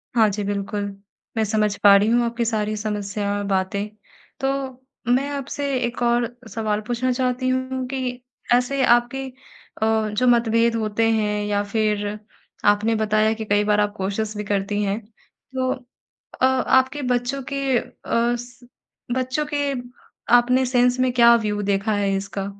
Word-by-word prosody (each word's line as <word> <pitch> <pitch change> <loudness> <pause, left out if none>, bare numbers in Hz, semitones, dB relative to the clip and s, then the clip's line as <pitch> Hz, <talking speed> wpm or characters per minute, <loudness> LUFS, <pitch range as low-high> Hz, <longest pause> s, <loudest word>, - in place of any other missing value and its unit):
हाँ 220 -2 +5
जी, 205 +1 -3
बिल्कुल। 200 +1 -2 0.5
मैं 220 - +3
समझ 210 -1 +1
पा 200 -1 +9
रही 200 +2 +4
हूँ 240 +1 +3
आपकी 235 0 -1
सारी 215 -2 -1
समस्या 205 -1 -3
और 205 - -3
बातें 195 +1 -1 0.5
तो 270 - 0 0.7
मैं 275 +3 +1
आपसे 280 0 -4 0.2
एक 240 +1 -5
और 240 0 +2 0.2
सवाल 215 -2 -1
पूछना 245 +1 0
चाहती 255 0 -1
हूँ 260 0 -1
कि 255 -2 -3 0.3
ऐसे 255 +2 +2
आपके 240 +3 +2 0.6
अ, 220 -1 +2
जो 230 +5 0
मतभेद 230 -1 +3
होते 225 0 +1
हैं 210 -2 0
या 205 0 0
फिर 210 -2 +1 0.7
आपने 220 +2 0
बताया 215 0 +2
कि 220 0 -6
कई 205 0 +2
बार 210 0 +2
आप 210 0 +1
कोशिश 205 +3 -2
भी 210 - -3
करती 205 +1 -1
हैं। 200 +1 -1 0.6
तो 255 0 0 0.7
अ, - - +6
आपके 260 +2 +2
बच्चों 245 +3 -1
के 275 -2 +1
अ, - - -2 0.5
स 245 0 -11 0.5
बच्चों 260 +4 -1
के, 285 -1 0 0.6
आपने 250 +2 +5
सेंस 250 0 +2
में 255 -1 +2
क्या 235 -1 +7
व्यू 210 -2 -1
देखा 200 +2 0
है 200 -1 +1
इसका 195 0 -4
225 Hz, 155 wpm, -22 LUFS, 210-250 Hz, 0.7 s, पा